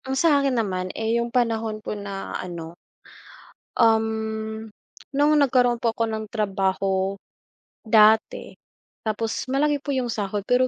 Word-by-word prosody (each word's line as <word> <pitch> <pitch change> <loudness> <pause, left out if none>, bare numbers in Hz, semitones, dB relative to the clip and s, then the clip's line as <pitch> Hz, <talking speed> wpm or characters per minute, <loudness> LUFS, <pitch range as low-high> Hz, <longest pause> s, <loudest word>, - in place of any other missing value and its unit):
Ang 265 0 -2
sa'kin 280 -4 +3
naman, 185 -4 -1
eh, 225 +1 +1
yung 235 - -3
panahon 225 -3 0
po - - -3
na 200 -2 -6
ano 170 -2 -6 1.1
um, 220 -1 +1 0.5
nung 290 +2 +4
nagkaroon 250 -3 +3
po 230 -1 0
ako 230 - 0
ng 220 0 -3
trabaho, 195 -2 0 0.7
dati, 220 - +3 0.5
tapos 220 0 -2
malaki 290 +2 +1
po 285 - -4
yung 250 -2 -1
sahod 205 -1 -3
pero 250 +1 +3
220 Hz, 130 wpm, -24 LUFS, 210-250 Hz, 1.1 s, nung